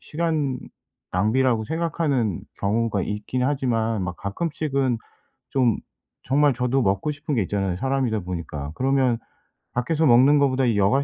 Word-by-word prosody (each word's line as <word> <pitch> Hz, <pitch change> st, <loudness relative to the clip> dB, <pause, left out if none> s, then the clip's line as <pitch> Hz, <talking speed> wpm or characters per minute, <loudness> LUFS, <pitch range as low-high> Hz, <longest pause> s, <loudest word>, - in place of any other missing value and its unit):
시간 155 Hz, -5 st, -1 dB, 0.5 s
낭비라고 110 Hz, +4 st, +2 dB
생각하는 150 Hz, -, -1 dB, 0.2 s
경우가 105 Hz, 0 st, +1 dB
있긴 105 Hz, +6 st, -3 dB
하지만 115 Hz, -6 st, 0 dB
막 90 Hz, -1 st, -4 dB
가끔씩은 140 Hz, +1 st, -1 dB, 0.5 s
좀 125 Hz, -5 st, +2 dB, 0.5 s
정말 145 Hz, +1 st, +3 dB
저도 125 Hz, +2 st, +1 dB
먹고 100 Hz, +7 st, +1 dB
싶은 145 Hz, 0 st, -3 dB
게 115 Hz, -, +2 dB
있잖아요 95 Hz, -1 st, -1 dB
사람이다 130 Hz, -1 st, 0 dB
보니까. 80 Hz, -5 st, -5 dB
그러면 130 Hz, -2 st, +2 dB, 0.6 s
밖에서 155 Hz, +6 st, +1 dB
먹는 130 Hz, +3 st, +6 dB
거보다 135 Hz, -2 st, +2 dB
이 115 Hz, -4 st, +2 dB
여가 105 Hz, +8 st, +3 dB
125 Hz, 315 characters per minute, -24 LUFS, 105-140 Hz, 0.6 s, 먹는